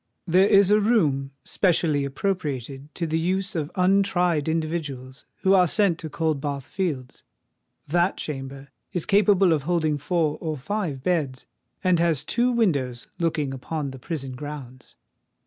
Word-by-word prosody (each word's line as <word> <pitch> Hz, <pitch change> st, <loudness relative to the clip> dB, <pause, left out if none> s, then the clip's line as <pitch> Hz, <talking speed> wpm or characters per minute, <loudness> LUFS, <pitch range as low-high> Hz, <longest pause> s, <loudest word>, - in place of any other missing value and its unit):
There 185 Hz, +2 st, +4 dB
is 200 Hz, -2 st, +5 dB
a 210 Hz, -, +6 dB
room 160 Hz, -, +2 dB
specially 160 Hz, -6 st, +1 dB
appropriated 140 Hz, -, -3 dB
to 170 Hz, -, -2 dB
the 160 Hz, 0 st, 0 dB
use 185 Hz, +3 st, -1 dB
of 155 Hz, -3 st, -2 dB
untried 180 Hz, -4 st, +2 dB
individuals 150 Hz, -5 st, -4 dB, 0.2 s
who 190 Hz, -, +5 dB
are 180 Hz, -2 st, +5 dB
sent 185 Hz, -2 st, +2 dB
to 160 Hz, -, -5 dB
Coldbath 145 Hz, -3 st, -2 dB
Fields. 145 Hz, -7 st, -4 dB, 0.6 s
That 175 Hz, +5 st, +1 dB
chamber 135 Hz, -1 st, -6 dB, 0.2 s
is 175 Hz, -, -1 dB
capable 195 Hz, -3 st, +4 dB
of 155 Hz, -, 0 dB
holding 155 Hz, -1 st, 0 dB
four 160 Hz, -1 st, 0 dB
or 155 Hz, -2 st, -3 dB
five 155 Hz, -2 st, -3 dB
beds, 145 Hz, -8 st, -1 dB, 0.4 s
and 180 Hz, -3 st, +3 dB
has 165 Hz, -5 st, +2 dB
two 240 Hz, +9 st, +1 dB
windows 140 Hz, -, 0 dB
looking 155 Hz, -5 st, 0 dB
upon 140 Hz, +2 st, -4 dB
the 130 Hz, -, -10 dB
prison 135 Hz, -1 st, -5 dB
grounds. 130 Hz, -2 st, -9 dB
160 Hz, 145 wpm, -24 LUFS, 140-185 Hz, 0.6 s, a